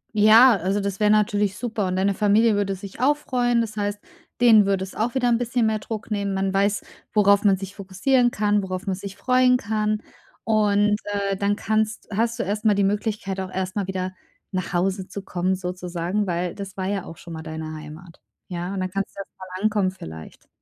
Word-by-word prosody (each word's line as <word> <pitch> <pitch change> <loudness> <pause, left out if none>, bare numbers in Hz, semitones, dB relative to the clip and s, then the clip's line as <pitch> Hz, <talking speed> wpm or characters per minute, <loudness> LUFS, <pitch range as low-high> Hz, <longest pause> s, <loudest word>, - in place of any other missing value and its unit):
Ja, 220 +4 +8
also 190 +3 -1
das 200 0 -3
wäre 210 -1 +3
natürlich 205 -1 +2
super, 220 -5 -2
und 185 - -1
deine 195 +1 +2
Familie 215 +3 +3
würde 200 -1 0
sich 195 +3 -10
auch 290 +3 +3
freuen, 245 -5 +1
das 220 -1 -4
heißt, 205 0 -2 0.4
denen 220 -4 +7
würde 195 -1 +1
es 190 - -8
auch 230 +3 -2
wieder 250 -2 +2
'n 235 -1 +3
bisschen 240 -1 0
mehr 220 -1 +1
Druck 220 +1 -6
nehmen. 200 -2 -1
Man 195 0 0
weiß, 200 +1 +1 0.3
worauf 200 0 +5
man 195 -2 +4
sich 195 +1 -7
fokussieren 230 +6 +2
kann, 210 -2 +1
worauf 185 0 -5
man 190 -1 -1
sich 195 0 -8
freuen 250 +2 +4
kann 215 -1 -1 0.4
und, 210 -1 +3
äh, 200 -1 -1
dann 200 +1 0
kannst 220 +1 -1
hast 230 +2 0
du - - -1
erstmal 210 +2 +1
die 200 - +2
Möglichkeit 205 -1 -1
auch 190 -1 -4
erstmal 190 +1 -2
wieder 185 -1 -3 0.4
nach 185 -2 -3
Hause 190 +2 0
zu 200 - -7
kommen, 185 +1 -1
sozusagen, 180 +2 -3
weil 175 0 -1
das 200 -1 -8
war 185 - -2
ja 195 -1 -2
auch 165 - -10
schon 170 -1 -10
mal 160 - -6
deine 160 0 -6
Heimat. 155 +3 -11 0.3
Ja, 175 +1 -4
und 190 - -2
dann 185 - -3
kannst 195 +1 -3
du - - -10
erst 195 - -7
mal 185 +1 -8
ankommen 205 -3 +2
vielleicht. 80 - -10
200 Hz, 210 wpm, -23 LUFS, 185-215 Hz, 0.4 s, Ja